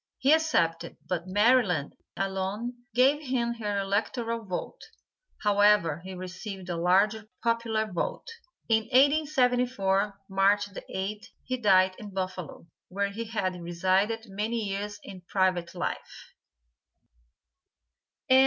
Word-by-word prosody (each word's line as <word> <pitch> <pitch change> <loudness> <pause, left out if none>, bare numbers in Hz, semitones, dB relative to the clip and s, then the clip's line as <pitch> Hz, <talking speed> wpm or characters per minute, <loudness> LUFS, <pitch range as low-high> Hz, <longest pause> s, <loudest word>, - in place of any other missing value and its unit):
He 275 +3 +4
accepted, 235 - +1
but 180 -1 -2
Maryland 205 - +3 0.2
alone 195 +5 -2 0.2
gave 270 +4 +4
him 250 -4 -1
her 205 -2 -2
electoral 225 +4 -1
vote; 185 -4 -5 0.6
however, 205 -6 +4
he 190 0 -7
received 185 +1 -7
a 175 - -1
large 190 +5 +3 0.3
popular 230 -1 +1
vote. 185 -5 -3 0.4
In 220 -1 +2
1874, 250 -7 +2
March 195 +1 +3
the - - -6
8th, 200 +2 -4 0.2
he 255 - -2
died 190 -5 +4
in 210 - -8
Buffalo, 185 -3 -5 0.2
where 200 +2 -2
he 230 +3 -5
had 185 -5 -2
resided 190 +6 0
many 210 +2 -2
years 205 +1 -4
in 185 -2 -10
private 185 -3 +1
life. 180 - -5
205 Hz, 115 wpm, -28 LUFS, 185-230 Hz, 0.6 s, He